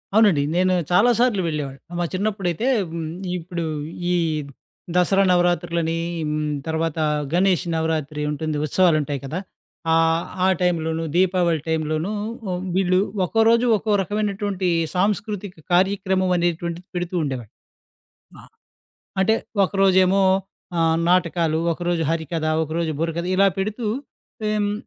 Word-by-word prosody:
అవునండి. 205 Hz, -10 st, +5 dB
నేను 185 Hz, +1 st, +3 dB, 0.2 s
చాలా 200 Hz, +7 st, +5 dB
సార్లు 240 Hz, -5 st, +3 dB
వెళ్లేవాడిని. 145 Hz, -4 st, -4 dB, 0.2 s
మా 175 Hz, -, +1 dB
చిన్నప్పుడైతే 195 Hz, +1 st, -1 dB, 0.2 s
హ్మ్, 165 Hz, -1 st, -4 dB, 0.3 s
ఇప్పుడు 170 Hz, -1 st, -4 dB, 0.5 s
ఈ -, -, +2 dB, 0.8 s
దసరా 195 Hz, +2 st, +4 dB
నవరాత్రులని, 170 Hz, -2 st, +1 dB, 0.3 s
హ్మ్, 150 Hz, 0 st, -1 dB, 0.2 s
తర్వాత 160 Hz, 0 st, -1 dB, 0.4 s
గణేష్ 185 Hz, 0 st, +2 dB
నవరాత్రి 155 Hz, -2 st, -1 dB
ఉంటుంది, 155 Hz, +1 st, -2 dB
ఉత్సవాలుంటాయి 155 Hz, -4 st, +2 dB
కదా. 155 Hz, +7 st, -3 dB, 0.5 s
ఆహ్, 165 Hz, +1 st, +3 dB, 0.2 s
ఆ -, -, +4 dB
టైంలోను, 165 Hz, -2 st, 0 dB
దీపావళి 180 Hz, -3 st, +2 dB
టైంలోనూ 160 Hz, +3 st, -1 dB, 0.4 s
హ్మ్, 180 Hz, 0 st, -3 dB
వీళ్ళు 185 Hz, -1 st, +3 dB, 0.3 s
ఒక్కో 225 Hz, +6 st, +1 dB
రోజు 235 Hz, +1 st, +4 dB
ఒక్కో 215 Hz, +2 st, -2 dB
రకమైనటువంటి 205 Hz, -2 st, -1 dB, 0.3 s
సాంస్కృతిక 205 Hz, 0 st, -1 dB, 0.2 s
కార్యక్రమం 190 Hz, 0 st, +2 dB
అనేటువంటిది 170 Hz, +1 st, -2 dB
పెడుతూ 175 Hz, +1 st, -3 dB
ఉండేవాళ్ళు. 130 Hz, -7 st, -5 dB, 0.9 s
ఆ! -, -, -15 dB, 0.8 s
అంటే 220 Hz, +4 st, +4 dB, 0.3 s
ఒకరోజేమో 190 Hz, 0 st, +3 dB, 0.6 s
ఆహ్, 165 Hz, 0 st, +3 dB
నాటకాలు, 170 Hz, -3 st, +2 dB
ఒకరోజు 175 Hz, 0 st, -1 dB
హరికథ, 160 Hz, 0 st, -2 dB, 0.2 s
ఒకరోజు 160 Hz, +1 st, -2 dB
బుర్రకథ 165 Hz, +1 st, -2 dB
ఇలా 195 Hz, +1 st, +5 dB
పెడుతూ, 215 Hz, +4 st, -2 dB, 0.6 s
హ్మ్, 210 Hz, -1 st, 0 dB
175 Hz, 115 wpm, -22 LUFS, 160-190 Hz, 0.9 s, అవునండి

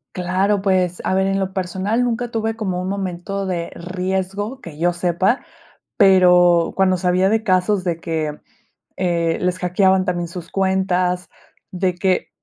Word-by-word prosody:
Claro, 190 Hz, +3 st, 0 dB
pues, 185 Hz, -2 st, +1 dB
a -, -, +1 dB
ver, 190 Hz, 0 st, +2 dB
en 195 Hz, 0 st, 0 dB
lo 190 Hz, 0 st, -2 dB
personal 190 Hz, +5 st, -1 dB
nunca 240 Hz, 0 st, -2 dB
tuve 225 Hz, 0 st, -1 dB
como 190 Hz, -5 st, -3 dB
un 185 Hz, -, -3 dB
momento 195 Hz, 0 st, -3 dB
de 175 Hz, -3 st, -3 dB
riesgo, 190 Hz, +6 st, -3 dB
que 155 Hz, -3 st, -10 dB
yo 175 Hz, +2 st, +1 dB
sepa. 180 Hz, +7 st, 0 dB, 0.5 s
Pero, 180 Hz, -4 st, +5 dB
cuando 190 Hz, -1 st, +3 dB
sabía 180 Hz, +1 st, +2 dB
de 220 Hz, +1 st, +1 dB
casos 185 Hz, 0 st, +1 dB
de 170 Hz, -3 st, -1 dB
que, 155 Hz, -3 st, -3 dB, 0.6 s
eh, 170 Hz, -2 st, 0 dB
les 180 Hz, 0 st, 0 dB
hackeaban 190 Hz, +1 st, +2 dB
también 175 Hz, -2 st, -2 dB
sus 170 Hz, 0 st, -9 dB
cuentas, 185 Hz, -2 st, 0 dB, 0.4 s
de 185 Hz, 0 st, -1 dB
que, 185 Hz, +1 st, 0 dB
185 Hz, 155 wpm, -20 LUFS, 180-195 Hz, 0.6 s, Pero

